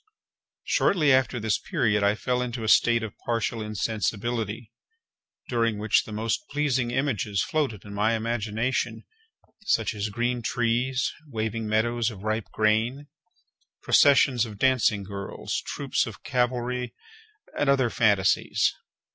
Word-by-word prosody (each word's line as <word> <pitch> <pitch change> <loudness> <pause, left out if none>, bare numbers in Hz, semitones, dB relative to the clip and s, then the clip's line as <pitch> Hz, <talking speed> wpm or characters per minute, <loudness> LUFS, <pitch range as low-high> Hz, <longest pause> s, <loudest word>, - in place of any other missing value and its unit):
Shortly 150 -8 +3
after 130 -1 +2
this 110 -2 0
period 105 -3 0
I 100 +1 +3
fell 125 +2 -1
into 120 -2 -4
a - - -3
state 115 +1 +4
of 110 -3 -6
partial 115 -1 -1
insensibility, 110 +1 -2 0.8
during 115 -3 0
which 105 0 +2
the - - -10
most 110 - -1
pleasing 135 -4 0
images 120 -7 0
floated 135 - -2
in 100 - -9
my 105 +3 +1
imagination; 115 +2 -2 0.6
such 115 - +1
as 105 0 -3
green 120 +3 -1
trees, 125 +3 0
waving 110 -3 -3
meadows 115 +2 +1
of 100 -4 -10
ripe 110 0 -2
grain, 115 +7 0 0.7
processions 135 -4 +5
of 110 -3 -6
dancing 120 -4 +2
girls, 100 0 -5
troops - - -1
of - - -10
cavalry, 125 0 -1 0.6
and 145 - +1
other 130 -4 +3
phantasies. 105 -5 +2
115 Hz, 130 wpm, -26 LUFS, 110-125 Hz, 0.8 s, processions